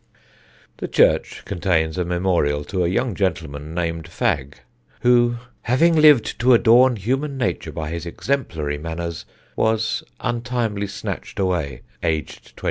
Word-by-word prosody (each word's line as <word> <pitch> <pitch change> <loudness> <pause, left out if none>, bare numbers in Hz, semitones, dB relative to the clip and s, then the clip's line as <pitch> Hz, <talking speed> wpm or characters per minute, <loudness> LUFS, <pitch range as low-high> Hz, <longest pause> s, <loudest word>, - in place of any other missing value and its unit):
The - - -4
church - - +2
contains 80 -3 0
a 90 - 0
memorial 85 -5 0
to 95 +3 -2
a - - +2
young 105 +6 0
gentleman 80 -5 -3
named 85 -2 -2
Fagg 70 0 -1 0.5
who, 120 -1 +4 0.3
"having 165 +8 +3
lived 150 -6 +5
to 125 +1 +6
adorn 120 +2 +5
Human 135 +7 -2
Nature 125 - -2
by 80 -1 -5
his 85 0 -5
exemplary 80 - -2
manners, 80 -1 -5 0.3
was 110 -1 +1 0.2
untimely 120 -4 -2
snatched 100 - -6
away, 85 -9 -1 0.2
aged 80 -2 -3
24." - - -12
95 Hz, 130 wpm, -22 LUFS, 80-120 Hz, 0.5 s, to